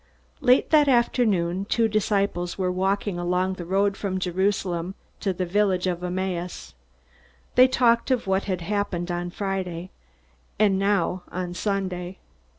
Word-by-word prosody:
Late 255 -3 +3
that 300 -2 +6
afternoon, 205 -8 +2
two 225 +2 +2
disciples 200 -4 0
were 185 -1 0
walking 190 0 -1
along 180 +2 0
the 180 -2 -7
road 195 +2 +1
from 195 -2 -3
Jerusalem 185 -1 -1 0.2
to 195 - 0
the 185 0 -2
village 190 0 +1
of 180 -1 -2
Emmaus. 180 -1 -4 0.8
They 255 +1 +7
talked 240 -2 +2
of 255 -2 +1
what 190 0 0
had 185 -3 -2
happened 190 -2 -2
on 175 0 -3
Friday, 185 -2 -4 0.7
and 200 -3 +3
now 195 -2 +1
on 180 -1 -4
Sunday. 185 -2 -3
190 Hz, 140 wpm, -25 LUFS, 180-205 Hz, 0.8 s, They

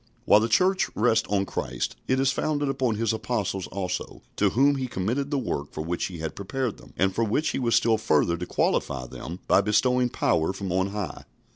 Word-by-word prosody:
While 105 - +7
the 115 +2 0
Church 185 - +3
rests 110 0 +2
on 100 -1 +1
Christ, - - -3
it 130 0 +2
is 135 0 +3
founded 145 -1 -1
upon 130 -4 0
His 115 0 0
Apostles 105 -5 -2
also, 90 -2 -4
to 105 - +3
whom 140 +7 +3
He 130 -1 -2
committed 120 +7 -2
the 145 - 0
work 75 - -3
for 75 - -4
which 85 +1 -1
He 90 - -6
had 80 -1 -5
prepared 120 +4 -3
them, - - -16
and 95 0 +2
for 115 - 0
which 115 +8 +1
He - - -2
was 120 -3 +2
still 115 -2 +3
further 85 -3 +2
to 90 +1 -5
qualify 65 -2 0
them 85 +7 -8
by - - +5
bestowing 125 +4 +2
power 80 -5 +1
from 95 -2 -5
on 95 +1 +1
high. 100 -6 -5
110 Hz, 215 wpm, -26 LUFS, 95-130 Hz, -, While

